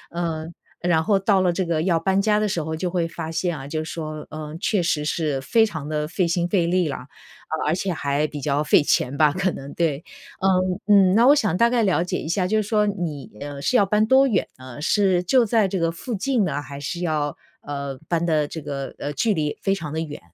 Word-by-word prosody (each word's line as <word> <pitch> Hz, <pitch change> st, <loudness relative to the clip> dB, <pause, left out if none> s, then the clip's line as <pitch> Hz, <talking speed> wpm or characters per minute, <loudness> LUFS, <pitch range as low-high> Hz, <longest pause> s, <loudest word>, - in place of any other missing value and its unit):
嗯， 165 Hz, -1 st, -3 dB, 0.3 s
然 165 Hz, -2 st, +2 dB
后 200 Hz, +2 st, +2 dB
到 195 Hz, 0 st, +3 dB
了 180 Hz, -1 st, +3 dB
这 180 Hz, +1 st, -1 dB
个 165 Hz, -2 st, 0 dB
要 170 Hz, -2 st, +2 dB
搬 190 Hz, +3 st, +1 dB
家 210 Hz, 0 st, +2 dB
的 215 Hz, -, +1 dB
时 175 Hz, -5 st, -1 dB
候 160 Hz, +1 st, -4 dB
就 175 Hz, +3 st, -2 dB
会 175 Hz, -2 st, 0 dB
发 165 Hz, -1 st, -6 dB
现 165 Hz, +1 st, -1 dB
啊， 135 Hz, 0 st, -8 dB
就 155 Hz, +1 st, -3 dB
说， 155 Hz, -1 st, -6 dB
呃， 155 Hz, 0 st, -7 dB
确 205 Hz, -5 st, +1 dB
实 155 Hz, -3 st, 0 dB
是 150 Hz, -3 st, -1 dB
非 225 Hz, +11 st, +3 dB
常 160 Hz, -7 st, -6 dB
地 150 Hz, -1 st, -1 dB
费 180 Hz, +3 st, 0 dB
心 170 Hz, +1 st, 0 dB
费 175 Hz, -2 st, +1 dB
力 180 Hz, -1 st, +2 dB
啦。 130 Hz, -, -5 dB, 0.4 s
呃， 160 Hz, -, -2 dB
而 -, -, +2 dB
且 185 Hz, +1 st, -1 dB
还 145 Hz, 0 st, 0 dB
比 145 Hz, -1 st, -7 dB
较 145 Hz, +1 st, 0 dB
费 150 Hz, -1 st, +4 dB
钱 135 Hz, -1 st, +1 dB
吧， 150 Hz, -2 st, +5 dB
可 185 Hz, +2 st, 0 dB
能， 140 Hz, -2 st, -8 dB
对。 160 Hz, -2 st, -1 dB, 0.4 s
嗯 185 Hz, 0 st, +1 dB, 0.3 s
嗯， -, -, +2 dB
那 230 Hz, -, +5 dB
我 285 Hz, -, +8 dB
想 210 Hz, -, +1 dB
大 235 Hz, +5 st, +4 dB
概 240 Hz, -1 st, +2 dB
了 185 Hz, -4 st, +2 dB
解 180 Hz, -, -2 dB
一 -, -, -6 dB
下， 180 Hz, +2 st, 0 dB
就 215 Hz, +3 st, +1 dB
是 205 Hz, -, -6 dB
说 210 Hz, -2 st, +2 dB
你， 175 Hz, -8 st, -4 dB
呃， 145 Hz, -1 st, -6 dB
是 250 Hz, -, +2 dB
要 200 Hz, -, +4 dB
搬 210 Hz, +2 st, +2 dB
多 265 Hz, +3 st, +5 dB
远 205 Hz, -7 st, +1 dB
呢？ 130 Hz, +2 st, -10 dB
是 190 Hz, 0 st, +2 dB
就 240 Hz, +7 st, +3 dB
在 220 Hz, -1 st, +3 dB
这 190 Hz, 0 st, -2 dB
个 165 Hz, 0 st, +1 dB
附 200 Hz, +9 st, -6 dB
近 235 Hz, +1 st, +1 dB
呢， 145 Hz, -4 st, -1 dB
还 140 Hz, -1 st, -9 dB
是 145 Hz, +5 st, -4 dB
要， 155 Hz, -4 st, -1 dB, 0.2 s
呃， 140 Hz, -2 st, -5 dB
搬 170 Hz, -1 st, +1 dB
的 155 Hz, -3 st, +2 dB
这 160 Hz, -, -6 dB
个， 140 Hz, -2 st, -5 dB
呃， 145 Hz, -, -4 dB
距 210 Hz, +9 st, +1 dB
离 150 Hz, -3 st, -2 dB
非 195 Hz, -, +1 dB
常 155 Hz, -6 st, -5 dB
地 160 Hz, -, -1 dB
远？ 150 Hz, -2 st, -6 dB
170 Hz, 265 characters per minute, -23 LUFS, 150-195 Hz, 0.4 s, 我